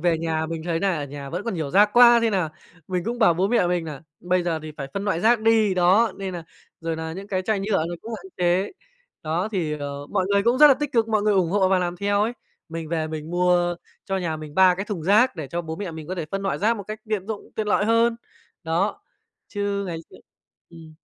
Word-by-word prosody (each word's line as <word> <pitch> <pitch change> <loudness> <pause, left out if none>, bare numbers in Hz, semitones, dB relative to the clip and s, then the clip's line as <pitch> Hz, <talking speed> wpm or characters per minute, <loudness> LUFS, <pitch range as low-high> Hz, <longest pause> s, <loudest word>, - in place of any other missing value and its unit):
về 170 -1 +2
nhà 160 -1 -1
mình 165 0 -5
thấy 165 -1 -1
nà 190 -2 +1
ở 145 - -3
nhà 140 0 -8
vẫn 180 +4 -3
còn 230 - -2
nhiều 155 -5 -3
rác 205 +2 +5
quá 240 -1 +8
thế 230 - +2
nà 185 -6 0 0.4
mình 180 -2 -2
cũng 240 +1 -3
bảo 215 -7 +5
bố 185 +4 +1
mẹ 235 -7 +3
mình 175 -1 0
nà 150 -4 -7 0.2
bây 180 0 +1
giờ 170 -2 -1
thì 155 0 -7
phải 135 - -5
phân 200 +1 -3
loại 185 -5 0
rác 230 +2 +4
đi, 220 -3 +3
đó, 185 +5 +4
nên 190 -2 -5
là 170 - -5 0.4
rồi 165 -1 -3
là 160 0 -5
những 195 +4 -7
cái 185 -2 -1
chai 210 0 0
nhựa 195 -5 0
nó 175 - -4
cũng 230 - -8
hạn - - -13
chế, 180 +2 +1 0.5
đó, 165 +6 -1
thì, 170 -6 -1
ờ 140 0 -6
mọi 190 -2 0
người 200 0 +3
cũng 240 +3 +2
rất 300 - +10
là 275 - +7
tích 290 +1 -4
cực, 230 -2 +2
mọi 215 -2 +1
người 210 0 +2
ủng 180 -4 +2
hộ 195 -1 +3
và 190 0 +3
làm 175 -1 -2
theo 200 +2 +1
ấy. 225 +3 0 0.4
Mình 165 -1 -6
về 160 -1 -1
mình 155 0 -6
mua 175 0 +2 0.3
cho 195 - -2
nhà 165 -4 -2
mình 155 -1 -9
3 185 -1 +6
cái 195 +2 -4
thùng 205 -6 -5
rác 205 +6 +4
để 155 -3 -5
cho 175 +5 -3
bố 160 -1 -6
mẹ 200 -3 -5
mình 160 -2 -8
có 185 - -4
thể 170 -3 -3
phân 195 0 -3
loại 195 - -1
rác 225 +3 +2
một 200 - -6
cách 215 +2 -7
tiện 210 -3 -2
dụng, 220 -2 -6
tiện 215 -1 -1
lợi 205 - +2
hơn. 230 +1 +3 0.5
Đó, 165 +1 -1 0.5
chứ 200 -1 -2
ngày 170 -3 -4
xưa - - -14 0.5
ừm. 160 -2 -13
185 Hz, 265 wpm, -23 LUFS, 165-210 Hz, 0.5 s, rất